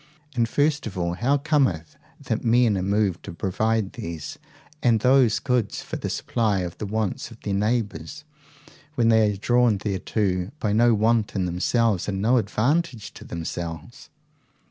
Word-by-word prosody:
And 115 -2 +1
first 150 0 +1
of 100 -3 -7
all, 85 -1 -1
how 130 +10 +1
cometh 135 - 0 0.2
it - - -16
that 110 - -1
men 120 -2 +3
are 95 - -1
moved 100 -2 0
to 100 - -6
provide 100 +4 -1
these 80 -3 -7 0.4
and 115 -3 +3
those 125 -2 +4
goods 125 -5 -1
for - - -6
the - - -4
supply 110 -5 0
of 90 -2 -5
the 105 - -4
wants 110 -1 -2
of 115 -1 -14
their 100 - -3
neighbours, 105 - -2 0.7
when 115 -2 +3
they 110 -2 +4
are - - -7
drawn 120 0 +3
thereto 95 -2 -1
by 105 -2 0
no 120 +1 +4
want 110 0 +1
in 95 -2 0
themselves, 95 +3 +1
and 95 -2 -2
no 115 +6 +3
advantage 120 +1 0
to - - -11
themselves? 85 -1 -6
110 Hz, 165 wpm, -24 LUFS, 95-120 Hz, 0.7 s, those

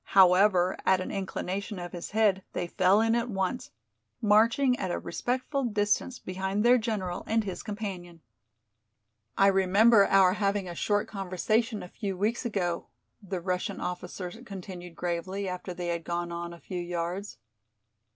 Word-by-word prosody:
However, 185 0 +6
at 190 -1 +4
an 185 - -4
inclination 195 +1 -4
of 175 -1 -6
his 175 -2 -6
head 210 -3 +2
they - - -2
fell 185 +4 +3
in 225 0 +2
at 235 +1 0
once, 190 +3 -2 0.5
marching 230 +4 +4
at - - -2
a 85 - -1
respectful 250 - -2
distance 210 +2 0
behind 190 +3 -2
their 245 +1 +6
general 205 -6 -2
and 225 0 +2
his 190 -3 -5
companion. 190 -6 -6 1.2
"I 195 - +5
remember 195 +3 +5
our 190 -2 +5
having 200 -2 0
a 175 - -5
short 205 +4 0
conversation 210 +4 -1
a - - -8
few 195 0 -5
weeks 220 +6 0
ago," 175 -6 -2 0.3
the 190 -3 -4
Russian 180 0 -2
officer 180 0 -5
continued 180 -5 -8
gravely, 185 +3 -3
after 180 0 -5
they 175 -1 -4
had 170 -1 -2
gone 175 0 -3
on 170 0 -5
a 170 - -11
few 180 +1 -5
yards. 175 +3 -4
190 Hz, 155 wpm, -28 LUFS, 180-210 Hz, 1.2 s, However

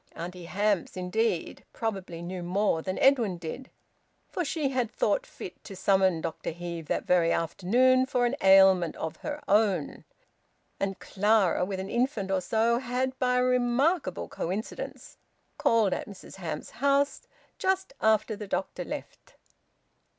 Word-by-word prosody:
Auntie 175 +1 -7
Hamps, 200 0 0
indeed, 185 0 -1
probably 190 -6 -4
knew 180 +1 -5
more 180 -1 +1
than 185 +2 -3
Edwin 235 -9 +3
did, 170 +11 -7 0.6
for 360 - -1
she 300 -2 -1
had 255 -4 0
thought - - 0
fit - - -10
to 195 - -9
summon 190 -3 +2
Dr 160 - -4
Heve 170 -1 -6
that - - -1
very 170 -2 +3
afternoon 250 +10 +2
for 250 -2 +1
an 240 +3 0
ailment 190 -3 +6
of 160 - -5
her 295 0 -5
own, 205 -2 +1 0.8
and 195 -1 -2
Clara, 205 -3 +2
with 190 0 -4
an 190 +1 -5
infant 235 -5 0
or 190 -1 +1
so, 225 +5 +2
had 260 +1 -2
by 250 -1 +2
a 250 - +3
remarkable 250 - +1
coincidence 215 - -5 0.4
called 220 -4 +3
at - - -4
Mrs 195 -1 -12
Hamps's 160 -5 -5
house 280 +3 +1 0.3
just 380 0 0
after 220 0 +2
the 210 0 -7
doctor 190 0 -3
left. - - -8
205 Hz, 145 wpm, -28 LUFS, 180-250 Hz, 0.8 s, ailment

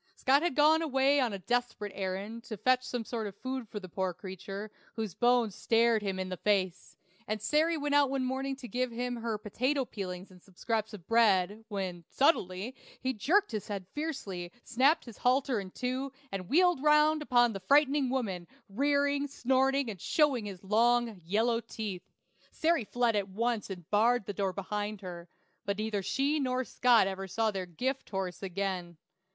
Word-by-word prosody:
Scott 275 -2 +3
had 345 -5 0
gone 310 +2 +5
away 280 -2 +3
on 250 -4 +1
a 200 - -3
desperate 235 0 -2
errand, 195 +4 -4
to 215 - -6
fetch 255 +4 +3
some 245 -3 -4
sort 225 -2 -3
of 200 -1 -9
food 260 -3 -5
for 210 - -5
the 185 - -9
poor 185 0 -2
creature, 195 +3 -7 0.2
whose 220 -5 -3
bones 240 -2 +2
stared 230 +2 +3
him 195 -2 -2
in 185 0 -3
the 185 - -4
face, 190 -3 -1 0.3
and 215 0 -2
Sary 310 +9 +2
went 290 -1 -1
out 285 -2 +5
one 270 -1 -1
morning 270 +1 -2
to 265 -2 -9
give 255 +1 -1
him 245 +1 -3
her 230 -2 -2
potato 255 +7 -1
peelings 185 -3 -6
and 180 -1 -16
some 190 0 -22
scraps 220 +1 -2
of 180 -5 -13
bread, 215 -2 +3
when, 190 -5 -4
suddenly, 225 - +1 0.3
he 260 0 -1
jerked 355 - +2
his 215 -3 -4
head 200 -3 -4
fiercely, 200 - -4
snapped 275 +7 +3
his 235 -4 -11
halter 255 -1 +2
in 195 -2 -6
two, 255 +6 -3 0.2
and 185 -2 -5
wheeled 355 -2 +4
round 300 +1 +4
upon 240 -5 +3
the 195 - -5
frightened 280 +5 +3
woman, 200 -10 -2 0.2
rearing, 285 +5 +1
snorting, 265 0 +1
and 200 -6 -6
showing 280 -8 +2
his 195 -2 -8
long, 230 0 +2
yellow 225 +7 +1
teeth. 215 -5 -6 0.4
Sary 325 -7 +1
fled 240 0 +1
at 200 -1 -1
once 230 +2 -1
and 180 -4 -8
barred 225 +2 +3
the 205 - -4
door 195 0 -1
behind 205 +2 -4
her; 175 -2 -8 0.3
but 200 0 -2
neither 215 -1 -1
she 280 +10 0
nor 255 -2 0
Scott 245 -3 +4
ever 195 0 -4
saw 220 +4 0
their 190 -2 -4
"gift 255 - -3
horse" 190 -3 -3
again. 185 -3 -3
225 Hz, 185 wpm, -31 LUFS, 195-265 Hz, 0.4 s, gone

